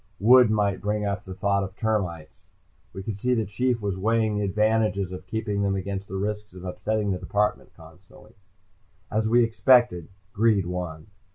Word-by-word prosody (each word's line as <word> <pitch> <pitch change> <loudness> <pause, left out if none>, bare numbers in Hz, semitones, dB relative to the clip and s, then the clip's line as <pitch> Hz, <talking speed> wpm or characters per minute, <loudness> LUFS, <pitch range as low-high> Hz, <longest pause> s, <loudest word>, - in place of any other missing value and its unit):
Wood 125 +2 +6
might 105 -3 0
bring 105 +1 -1
up 100 -1 -3
the 95 -1 -8
thought 100 0 +1
of 95 0 -7
termites. 95 -9 -3 0.4
We 95 - -8
could 100 -1 -6
see 125 0 +2
the 110 -2 0
Chief 120 +4 -1
was 100 -2 -3
weighing 110 +1 +1
the 105 - -1
advantages 105 -1 +1
of 90 0 -8
keeping 105 -2 -2
them 100 -1 +1
against 100 +1 -4
the 95 - -7
risks 105 0 -4
of 90 0 -10
upsetting 105 +3 -2
the 90 - -2
department 105 +2 -1
constantly. 90 +6 -17 0.8
As 110 0 0
we 120 +1 +5
expected, 115 - +3 0.3
greed 105 -3 +2
won. 90 -3 -5
105 Hz, 175 wpm, -25 LUFS, 95-110 Hz, 0.8 s, Wood